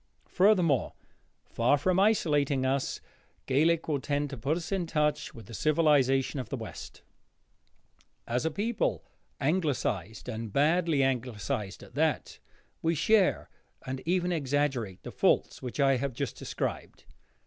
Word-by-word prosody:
Furthermore, 180 - +3 0.5
far 120 +5 +2
from 185 +6 +1
isolating 145 -10 +2
us, 135 0 -1 0.4
Gaelic 160 +5 +2
will 150 -3 0
tend 145 +1 -2
to - - -4
put 145 +8 0
us 170 +1 -6
in 190 -3 -1
touch 150 -2 0
with 115 - -11
the 115 - -11
civilization 145 -2 +2
of 125 - -5
the - - -3
West. - - -9 1.2
As 120 +2 -1
a 160 - +1
people 200 - -1 0.3
Anglicised, 135 - -1
and 115 -3 -5
badly 155 - +2
Anglicised 125 -4 -2
at - - -15
that, - - -1 0.4
we 165 +1 +1
share, 195 +5 +3 0.4
and 130 0 -4
even 180 0 +1
exaggerate, 140 - -1
the - - -7
faults - - +1
which 125 +2 -6
I 135 -1 +4
have 135 +1 -2
just - - -3
described. - - -5
145 Hz, 135 wpm, -29 LUFS, 130-165 Hz, 1.2 s, I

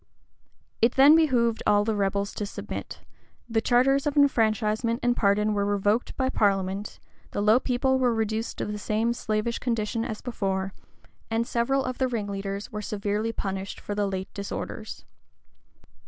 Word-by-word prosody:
[] - - -43
It 245 - -11
then 280 +3 +8
behoved 245 -8 +2
all 205 0 +4
the 220 -1 0
rebels 200 0 -1
to 210 - -4
submit: - - -7 0.5
the 225 -1 +1
charters 270 +5 +3
of 295 0 -1
enfranchisement 225 -3 +2
and 245 0 +2
pardon 210 0 +2
were 200 -1 +1
revoked 205 +3 0
by 260 - +1
parliament; 195 -3 0 0.3
the - - -4
low 215 +4 +5
people 260 +1 +1
were 250 -2 +3
reduced 220 0 -2
to - - -2
the 210 0 -4
same 220 +3 0
slavish 220 0 -2
condition 230 -2 -1
as 220 -2 -4
before; 195 -5 -2 0.6
and 225 +1 0
several 260 +4 0
of 255 -1 -4
the 260 - +2
ringleaders 200 -3 -4
were 210 -1 -4
severely 210 +2 -2
punished 195 -2 -4
for 205 - -5
the 205 0 0
late 190 -1 -4
disorders. 200 0 -6
220 Hz, 160 wpm, -26 LUFS, 205-240 Hz, 0.6 s, then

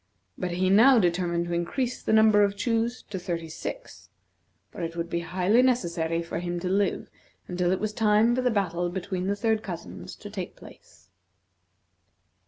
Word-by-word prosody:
But 180 -1 -3
he 185 +1 +1
now 240 +6 +7
determined 175 -3 +1
to 175 - -4
increase 240 +9 -2
the - - -2
number 220 -1 +6
of 200 0 0
chews 230 +3 -1
to 190 - -3
thirty 170 -3 -4
six, - - -8 0.6
for 185 - -8
it 165 0 -4
would 170 0 -4
be 170 - 0
highly 180 +7 +2
necessary 170 -10 0
for 165 0 -4
him 175 0 -3
to 185 - -3
live 195 +1 0 0.4
until 180 0 0
it 185 - +1
was 215 0 -2
time 215 +2 +3
for 255 - 0
the 250 - +2
battle 175 -5 0
between 185 0 -3
the 200 - +1
third 220 +1 0
cousins 175 -5 -8
to 205 - -10
take 190 -4 -6
place. - - -17
190 Hz, 180 wpm, -26 LUFS, 175-220 Hz, 0.6 s, now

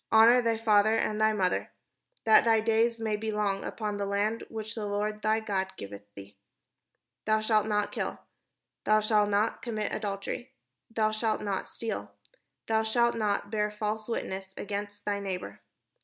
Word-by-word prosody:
" - - -56
Honour 230 +3 +7
thy 230 -1 +1
father 215 -1 +4
and 215 -1 0
thy 220 0 +5
mother: 190 -4 0 0.5
that 220 -1 +7
thy 225 -1 +4
days 225 +1 +2
may 220 -1 0
be 220 +1 -3
long 205 -2 0
upon 210 -2 -3
the 200 - -2
land 205 +3 0
which 220 0 -5
the 215 -3 -4
Lord 210 +1 -2
thy 215 +1 +2
God 190 -3 -2
giveth 100 +1 -9
thee. 100 0 -11 0.9
"Thou 215 0 +3
shalt 215 -1 +2
not 210 -1 0
kill. - - -3 0.7
"Thou 215 0 +4
shalt 210 -1 +3
not 205 +2 +1
commit 220 -3 -3
adultery. 205 +4 -4 0.4
"Thou 220 -1 +1
shalt 215 0 0
not 200 -2 -2
steal. 105 - -5 0.5
"Thou 220 0 +2
shalt 235 +2 +2
not 205 -2 -1
bear 210 -1 +1
false 215 +1 -3
witness 190 -4 -4
against 205 0 -5
thy 205 -1 0
neigh 195 -2 -2
bour. 100 - -10
215 Hz, 170 wpm, -29 LUFS, 205-220 Hz, 0.9 s, Honour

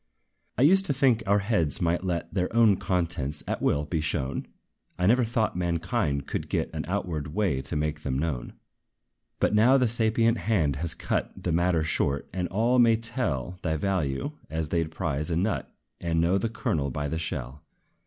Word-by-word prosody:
I 125 - +3
used 190 +6 +5
to 140 - +1
think 125 -4 +3
our 100 +1 +4
heads 85 - +1
might 85 +1 +1
let 85 -3 -3
Their 90 -2 0
own 115 -4 +6
contents, 80 -5 -1
at - - -2
will, 75 +1 +1
be 80 +1 -1
shown; 70 -3 -2 0.5
I 90 - 0
never 120 +6 +4
thought 115 -3 0
mankind 85 -5 -1
could - - -4
get - - -1
An - - -3
outward 75 -3 -3
way 95 -11 +1
to - - -5
make 75 +1 -1
them 65 -3 -2
known. 70 -5 -3 0.9
But - - +2
now 120 +6 +6
the 125 -2 +3
sapient 115 0 +2
hand 80 -11 +1
has 85 +3 -3
cut - - -3
The 90 - 0
matter 85 -1 +2
short, 70 -3 0
and 90 -1 -1
all 115 +6 +2
may 115 -2 +6
tell 95 - -3
Thy 80 -2 0
value, 80 - -1 0.2
as 80 -1 -3
they 85 0 +1
'd 80 - -7
prize 80 -2 -2
a 85 - 0
nut, 100 +5 -1 0.3
And 85 -1 0
know 90 +4 +3
the 115 - -1
kernel 75 -10 -1
by 75 +3 -3
the 80 +2 -2
shell. 70 -5 -4
85 Hz, 190 wpm, -27 LUFS, 75-110 Hz, 0.9 s, own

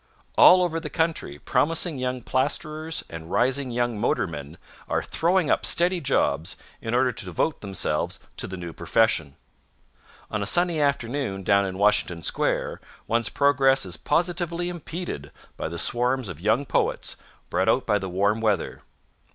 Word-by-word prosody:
All 180 0 +8
over 165 -2 -1
the - - -6
country 160 - -1
promising 160 - 0
young 125 0 -2
plasterers 155 +5 -1
and 80 0 -9
rising 130 +2 +1
young 120 -2 -1
motormen 80 - -2 0.3
are - - 0
throwing 175 -1 +1
up - - +2
steady 175 +1 +2
jobs 80 - +1 0.3
in 115 +1 -2
order 125 0 +3
to 110 -3 -7
devote 90 - -1
themselves 95 -6 -1 0.2
to - - -2
the 95 - -6
new 85 -2 -7
profession. 80 -11 +1 1.0
On 110 - -1
a 100 - -2
sunny 175 - +2
afternoon 130 -7 -1
down 100 +1 +3
in 95 0 -5
Washington 95 -4 +2
Square - - 0 0.2
one's 115 0 +1
progress 135 -2 +3
is 90 -3 -3
positively 175 - 0
impeded 170 - -6 0.2
by - - -4
the 85 +1 -6
swarms 125 +4 +1
of 85 -3 -8
young 110 +8 +2
poets - - 0 0.3
brought - - +2
out - - +2
by 105 - +2
the 95 -1 -5
warm 100 +4 +1
weather. 105 -5 0
120 Hz, 155 wpm, -25 LUFS, 95-155 Hz, 1.0 s, All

